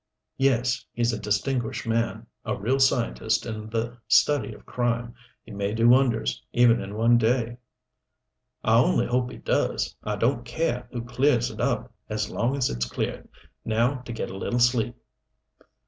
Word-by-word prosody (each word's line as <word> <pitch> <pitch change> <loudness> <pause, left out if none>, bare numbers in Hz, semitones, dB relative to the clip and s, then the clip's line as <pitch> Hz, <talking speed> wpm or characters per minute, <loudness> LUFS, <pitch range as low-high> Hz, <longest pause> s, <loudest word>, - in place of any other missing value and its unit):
"Yes. 125 -2 +1
He's 120 0 +1
a 110 - -3
distinguished 110 +4 -1
man 115 0 -1 0.2
a - - -2
real 125 +7 0
scientist 120 -4 +1
in 110 -2 -6
the 115 +2 -3
study 145 +6 +3
of - - -13
crime. 120 -1 -1 0.3
He 115 - -13
may 100 +1 -2
do 115 +1 +4
wonders, 125 -2 +3
even 120 -1 +5
in 100 +1 -7
one 115 +2 +4
day." 120 0 +1 1.1
"I 115 +1 +5
only 175 +8 +3
hope 125 0 0
he - - -9
does! - - -1
I 105 -1 -2
don't 120 +3 +1
care 125 0 -2
who 120 -1 -4
clears 125 0 +1
it - - -6
up - - -1 0.2
as 105 -1 -2
long 120 +5 0
as 130 - +2
it's - - -2
cleared. - - -4 0.3
Now 115 +5 +1
to 125 -1 -9
get 115 - -4
a - - -7
little 120 +5 -1
sleep." 120 -1 +2
120 Hz, 165 wpm, -25 LUFS, 110-125 Hz, 1.1 s, even